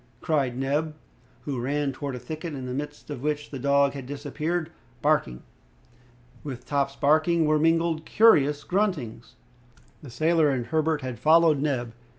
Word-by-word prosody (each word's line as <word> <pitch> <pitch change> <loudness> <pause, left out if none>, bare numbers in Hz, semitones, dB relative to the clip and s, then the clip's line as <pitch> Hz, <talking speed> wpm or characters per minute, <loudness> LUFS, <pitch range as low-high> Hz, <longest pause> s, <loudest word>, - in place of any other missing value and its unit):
cried 135 -6 0
Neb, 145 +4 -1 0.5
who 135 -5 -4
ran 140 +2 -1
towards 135 -1 -5
a - - -8
thicket, 155 +5 -6
in 130 -2 -6
the 125 - -4
midst 145 +2 -6
of 135 -4 -6
which 150 0 -3
the 135 - -6
dog 140 +1 +3
had 135 -3 -8
disappeared, 155 +4 -3 0.3
barking. 145 - +1 1.0
With 130 -4 -7
Top's 140 0 -1
barking 160 +4 +3
were 155 0 +2
mingled 165 0 +1
curious 150 -11 +4
gruntings. 150 - -2 0.7
The 145 - -11
sailor 155 +5 +2
and 130 -4 -1
Herbert 155 +3 0
had 125 -3 -6
followed 160 +1 +5
Neb. 125 -6 -2
145 Hz, 155 wpm, -26 LUFS, 135-155 Hz, 1.0 s, followed